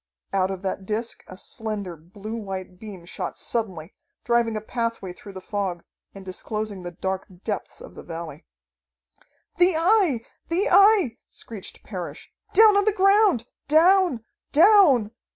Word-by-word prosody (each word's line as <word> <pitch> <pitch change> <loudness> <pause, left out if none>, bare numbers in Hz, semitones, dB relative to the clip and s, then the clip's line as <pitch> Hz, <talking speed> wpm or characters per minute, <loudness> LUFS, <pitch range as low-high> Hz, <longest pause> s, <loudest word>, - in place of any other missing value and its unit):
Out 190 -1 +2
of 190 0 -6
that 190 0 -4
disc 225 +2 -3
a 185 - -11
slender, 205 -4 -5
blue 195 +7 -9
white 190 -4 -6
beam 200 -5 -10
shot 180 0 -5
suddenly, 190 -8 -3 0.3
driving 235 -2 +1
a - - -1
pathway 230 -4 -3
through 200 +2 -12
the 190 - -8
fog, 190 -3 -3 0.3
and 195 -1 -10
disclosing 210 +1 -4
the 175 - -6
dark 190 +2 -4 0.2
depths 215 - -4
of - - -12
the - - -10
valley. 165 -3 -8 1.2
"The 355 -1 +5
Eye! 335 - +2 0.2
The 365 +7 +1
Eye!" 395 - +5
screeched 215 -5 -9
Parrish. - - -7 0.2
"Down 430 +1 +7
on 405 - +3
the 430 - +4
ground! 395 - +4 0.2
Down! 325 - +4 0.3
Down!" 310 - +6
220 Hz, 145 wpm, -24 LUFS, -, 1.2 s, Down